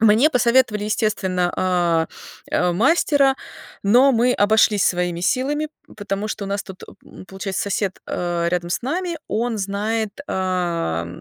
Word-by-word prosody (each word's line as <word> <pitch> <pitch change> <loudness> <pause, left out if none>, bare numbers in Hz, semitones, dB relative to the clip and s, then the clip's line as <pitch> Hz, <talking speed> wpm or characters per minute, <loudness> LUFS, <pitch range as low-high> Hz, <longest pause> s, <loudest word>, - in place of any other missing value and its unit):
Мне 225 +6 +5
посоветовали, 240 -5 +2
естественно, 195 -5 0
а, 175 -3 +1 0.4
а, 180 0 +1
мастера, 275 - +3 0.5
но 245 +7 +5
мы 245 +2 +3
обошлись 210 -2 +3
своими 175 -1 0
силами, 275 +9 0 0.3
потому 205 0 -3
что 215 -1 -4
у - - -6
нас 200 0 -2
тут, 190 -1 -11 0.2
м, - - -13
получается, 190 +1 -4
сосед, 200 -1 -2
а, 175 -1 -1
рядом 175 0 -2
с 175 - -1
нами, 340 +5 -2
он 230 +1 -1
знает, 210 +3 -2
а 175 - -1
205 Hz, 140 wpm, -21 LUFS, 180-235 Hz, 0.5 s, Мне